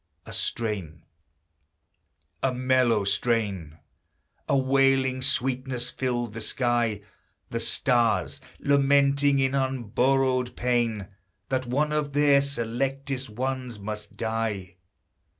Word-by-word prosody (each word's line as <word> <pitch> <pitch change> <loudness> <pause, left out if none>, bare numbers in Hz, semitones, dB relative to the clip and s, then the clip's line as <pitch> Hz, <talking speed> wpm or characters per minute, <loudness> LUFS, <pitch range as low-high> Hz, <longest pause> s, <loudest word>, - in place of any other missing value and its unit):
A - - -8
strain 100 -8 -3 1.4
a 135 - +1
mellow 125 -4 +2
strain 100 -7 -1 0.7
A 140 - +4
wailing 135 -1 +2
sweetness 130 -2 -1
filled 120 -4 -2
the 115 - -6
sky; 120 -2 0 0.5
The - - -2
stars, 120 -3 +1 0.2
lamenting 140 0 +3
in 135 -1 +2
unborrowed 130 0 +1
pain, 120 -5 0 0.4
That 130 -1 -1
one 145 +5 0
of 150 -2 -1
their 145 -1 +5
selectest 135 +1 -2
ones 125 +1 -3
must 105 0 -7
die! 110 -5 -3
125 Hz, 95 wpm, -26 LUFS, 115-135 Hz, 1.4 s, their